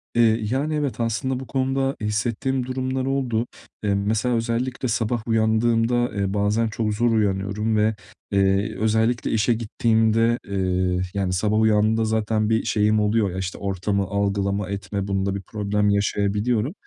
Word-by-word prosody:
Eee, 115 -1 +4
yani, 145 +4 0
evet, 140 -7 -2
aslında 120 +3 -1
bu 130 - -8
konuda 135 0 0
hissettiğim 115 +5 -1
durumlar 130 0 -2
oldu. 125 -4 -1 0.4
Eee, 100 -1 +1
mesela, 110 +5 0
özellikle 120 +3 -1
sabah 115 0 -1
uyandığımda, 115 +2 +2
eee, 100 -1 -1
bazen 105 +3 +1
çok 110 -1 -2
zor 120 +3 +1
uyanıyorum 105 0 0
ve, 105 +1 +2 0.4
eee, 100 0 +2
özellikle 110 +2 +1
işe 110 +2 +2
gittiğimde, 115 +1 +1
eee, 95 -2 0
yani, 95 -2 -1
sabah 105 +4 +1
uyandığımda 110 +1 +3
zaten 110 -1 0
bir 110 0 +2
şeyim 105 0 +2
oluyor. 105 -1 +1
Ya, 90 - -6
işte, 95 0 -4
ortamı 100 +1 -1
algılama 100 0 -1
etme, 100 0 -4
bunda 100 0 -1
bir 100 - -4
problem 105 +1 -1
yaşayabiliyorum. 105 - 0
110 Hz, 145 wpm, -23 LUFS, 100-120 Hz, 0.4 s, Eee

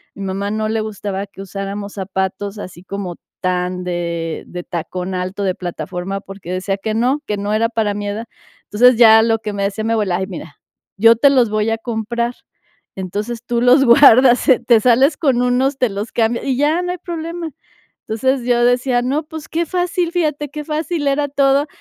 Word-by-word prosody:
Mi 200 - -7
mamá 195 +1 -3
no 215 0 -1
le 220 0 0
gustaba 205 -2 -4
que 195 0 -12
usáramos 200 +1 -6
zapatos 190 +1 -3
así 180 -3 -9
como 190 -2 -5 0.3
tan 180 0 -1
de 170 -2 -3
de 175 0 -7
tacón 180 +2 -5
alto 185 +2 -3
de 185 -2 0
plataforma, 180 +2 -5
porque 195 -3 -9
decía 195 +1 -2
que: 215 +2 -3
"No, 255 +6 +1
que 210 - -2
no 205 +1 -3
era 225 +1 +2
para 220 -3 -1
mi 205 0 -4
edad". 215 +3 -4 0.4
Entonces, 245 +3 +5
ya 225 -2 +8
lo 225 -1 +1
que 215 -1 -5
me 200 0 -2
decía 200 +2 -2
me 225 +1 0
abuela: 200 -5 0
"Ay 190 - -3
mira, 165 -6 -9 0.4
yo 230 +3 +6
te 280 +5 +5
los 250 -5 +3
voy 215 +1 0
a 225 - 0
comprar. 235 +1 -3 0.6
Entonces, 210 +6 -4
tú 240 -1 -1
los 250 +3 +5
guardas, 250 0 +6
eh, 255 - +6
te 235 -2 +5
sales 260 +6 +4
con 270 -7 +1
unos, 255 +2 +1
te 250 - +2
los 205 +3 -5
cambias, 235 +1 0
y 265 -2 0
ya 305 +5 +2
no 355 - -2
hay - - -6
problema". 335 -1 -5 0.6
Entonces, 255 +3 0
yo 240 -1 +2
decía: 245 0 +2
"No, 280 +5 -1
pues, 315 0 -9
qué 335 +1 -1
fácil", 355 0 -1
fíjate, 300 -4 -1
qué 300 +1 -6
fácil 310 0 -2
era 285 +1 +1
todo, 275 +1 +2
225 Hz, 200 wpm, -18 LUFS, 195-265 Hz, 0.6 s, ya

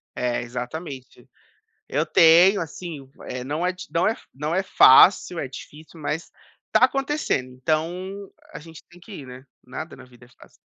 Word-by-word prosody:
É, 125 -1 -1
exatamente. 130 +3 -8 0.6
Eu - - -1
tenho, 175 +5 +6
assim, 165 -2 -7
v 135 - -28 0.3
eh, 125 - -6
não 150 +6 -2
é 180 - 0
d 180 - -10
não 170 +2 +1
é 220 - +2 0.2
não 150 +4 -3
é 190 - +1
fácil, 180 0 +6
é 135 - -4
difícil, 155 +4 -12
mas, 150 +2 -4 0.4
tá 215 +3 +5
acontecendo, 270 - -1
então, 175 +9 -3 0.2
a - - -6
gente 160 0 -13
tem 175 0 -18
que 210 - -14
ir, - - -13
né. 125 +1 -12 0.2
Nada 155 +6 -8
na - - -13
vida 125 -1 -19
é - - -24
fácil. 125 - -20
160 Hz, 180 wpm, -23 LUFS, 130-180 Hz, 0.6 s, tenho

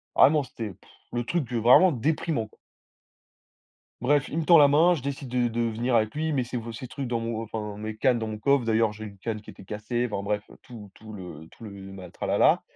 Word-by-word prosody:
vraiment, 150 0 +5
c'était 115 -5 -6
pff 90 - -20 0.2
le 120 0 -1
truc, 140 0 -2
heu, 120 - +1
vraiment 125 +11 +6
déprimant, 145 -2 -1
quoi. - - -26 1.4
Bref, 140 +2 +2
il 160 - -3
me 165 - -1
tend 170 +1 +7
la 145 - +8
main. 160 +5 +5
Je 150 - -5
décide 140 0 -5
de 125 0 +1
de 115 +1 -3
venir 115 +2 0
avec 110 -1 +2
lui. 155 +1 -1
Il 155 - -1
met 130 -3 +1
ces 120 - -6
v 115 -1 -5
ces 125 +3 -8
trucs 135 +1 -5
dans 120 -1 -1
mon 115 -1 -3
enfin, 105 -2 -5
mes 110 +1 -5
cannes 125 +2 +2
dans 110 - -3
mon 110 -1 -5
coffre. 140 +3 +2
D'ailleurs 110 -1 +2
j'ai 110 +1 -9
une 100 -2 -10
canne 110 +2 -4
qui 105 - -12
était - - -14
cassée, 110 +5 -2
enfin, 100 -1 -3
bref, 105 0 -1 0.2
tout 115 -6 -11
tout 110 0 -12
le 90 -6 -9
tout - - -14
le 105 - -7 0.2
ma 95 -2 -10
tralala - - +2
115 Hz, 245 wpm, -26 LUFS, 110-135 Hz, 1.4 s, la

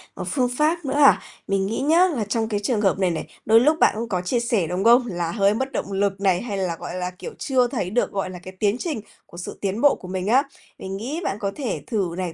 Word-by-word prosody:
một - - -5
phương 255 -3 +1
pháp 320 +2 +1
nữa 265 - -1
à? 290 -1 +6 0.3
Mình 195 -1 +1
nghĩ 220 +5 -2
nhá 330 +6 +5
là 280 -11 -2
trong 220 +2 -1
cái 205 -2 -1
trường 210 +1 0
hợp 195 -2 +2
này 185 -2 +2
này, 165 - -4 0.2
đôi 225 +1 +6
lúc 305 +6 +3
bạn - - +4
cũng 230 0 -4
có 185 -4 0
chia 180 +7 0
sẻ, 230 -7 0
đúng 180 +4 -2
không? 240 +3 +6
Là 175 -5 -2
hơi 200 0 +3
mất 265 +5 -2
động 200 - -3
lực 195 0 0
này, 190 -3 +2
hay 210 -5 -4
là, 185 -3 -1
gọi 175 - -6
là, 180 0 -2
kiểu, - - -6
chưa 255 -3 +2
thấy 235 -8 -3
được, 240 +5 0
gọi 195 -2 -2
là, 180 -1 -8
cái 185 - -9
tiến 205 0 +2
trình 300 -9 -3 0.2
của 170 - -14
sự 180 - -7
tiến 200 +3 -2
bộ 285 - +5
của 185 - -11
mình 185 +1 -3
á. 255 +6 +4 0.4
Mình 190 0 -5
nghĩ 270 - -4
bạn 195 - -2
có 200 -1 -2
thể 270 -5 -3
thử 195 -8 -1
này, 180 -3 -3
205 Hz, 275 wpm, -23 LUFS, 190-250 Hz, 0.4 s, à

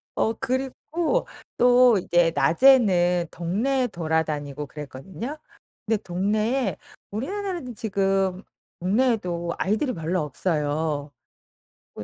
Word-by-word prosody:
어 225 - +1
그리고 270 - -1 0.3
또 245 -2 +6
이제 175 -1 +2
낮에는 175 - +4
동네에 235 +10 0
돌아다니고 155 - -2
그랬거든요. 150 - -7 0.5
근데 220 0 +1
동네에 210 - 0 0.3
우리나라는 345 - -4
지금 195 -3 0 0.4
동네에도 180 -4 0
아이들이 220 +7 0
별로 170 0 -1
없어요. 150 -1 -1 0.8
뭐 - - -7
195 Hz, 245 characters per minute, -24 LUFS, 165-250 Hz, 0.8 s, 또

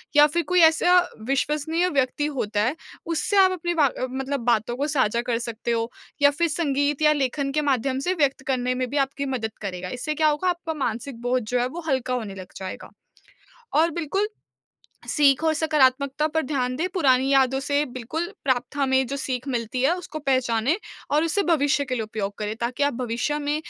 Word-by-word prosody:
या 295 0 +8
फिर 340 +3 -1
कोई 360 0 +3
ऐसा 325 +3 +5 0.3
विश्वसनीय 300 +5 0
व्यक्ति 275 -1 0
होता 215 -8 -1
है 250 +7 0 0.3
उससे 335 +5 0
आप 375 -1 +6
अपनी 345 -1 -2
बा 295 -5 +3 0.2
मतलब 270 +2 -3
बातों 240 0 +1
को 285 +3 0
साझा 240 -6 +1
कर 240 -1 -1
सकते 235 0 -4
हो 230 0 0 0.3
या 285 - +7
फिर 335 +4 +1
संगीत 285 -2 0
या 300 0 +5
लेखन 275 0 -1
के 300 +2 +1
माध्यम 265 -1 0
से 370 - +2
व्यक्त 285 -6 +1
करने 255 -1 0
में 255 0 -1
भी 285 - -2
आपकी 275 +1 0
मदद 220 -3 -2
करेगा। 180 -2 -5
इससे 250 +7 -3
क्या 310 +1 +3
होगा 305 +5 +1
आपका 340 -2 -2
मानसिक 245 -2 -4
बोझ 250 +1 +1
जो 245 0 +1
है 245 - +1
वो 330 +7 -7
हल्का 260 -3 0
होने 215 -6 -3
लग 185 -1 -10
जाएगा। 190 -1 -7 0.9
और 320 +3 +4
बिल्कुल, 340 +5 -1 0.8
सीख 280 -1 +3
और 320 - +3
सकारात्मकता 285 -2 +2
पर 320 +1 0
ध्यान 255 -3 -1
दें, 340 +6 -1
पुरानी 265 -6 +3
यादों 265 0 +3
से 285 +1 +1
बिल्कुल 260 +7 -3 0.2
प्राप्त 260 +1 0
हमें 265 -2 +2
जो 275 - -4
सीख 260 -1 -3
मिलती 240 0 -2
है 290 +6 +3
उसको 325 -3 -7
पहचानें 260 -1 +1 0.3
और 300 +3 +3
उसे 365 +5 +1
भविष्य 290 -5 +2
के 255 - -3
लिए 235 - -2
उपयोग 215 -2 -4
करें, 210 0 -3
ताकि 245 +4 -3
आप 285 0 +3
भविष्य 245 +4 -2
में 290 0 -1
275 Hz, 200 wpm, -24 LUFS, 250-305 Hz, 0.9 s, या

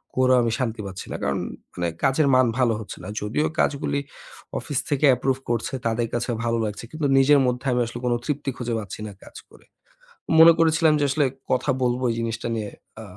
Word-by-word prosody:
করেও 130 0 +4
আমি 115 -1 0
শান্তি 115 -4 -2
পাচ্ছি 95 -1 -7
না। - - -3
কারণ - - 0 0.3
মানে 90 -1 -2 0.2
কাজের 140 +2 +3
মান 130 0 +5
ভালো 125 -3 +3
হচ্ছে 110 - -8
না। - - -7
যদিও 105 +9 0
কাজগুলি 140 0 0 0.6
অফিস 145 - -2
থেকে 145 0 +2
approve 135 +1 -1
করছে, 120 +1 -1
তাদের 115 +1 0
কাছে 120 +1 -2 0.2
ভালো 115 0 +1
লাগছে 105 +1 -5
কিন্তু 155 -1 -3
নিজের 140 +2 +6
মধ্যে 125 +1 -1
আমি 125 0 +1
আসলে 120 +1 -7
কোন 120 - +2
তৃপ্তি 145 -2 -2
খুঁজে 120 -1 -3
পাচ্ছি 105 -1 -8
না - - -7
কাজ - - -15 0.2
করে। - - -19 0.7
মনে 165 +1 +10
করেছিলাম 160 -1 +4
যে 145 - +2
আসলে 145 +1 +2 0.3
কথা 130 +2 +1
বলব 125 0 0
এই - - -3
জিনিসটা 115 0 -3
নিয়ে, 105 -2 -3 0.3
আ - - -8
125 Hz, 200 wpm, -24 LUFS, 115-140 Hz, 0.7 s, মনে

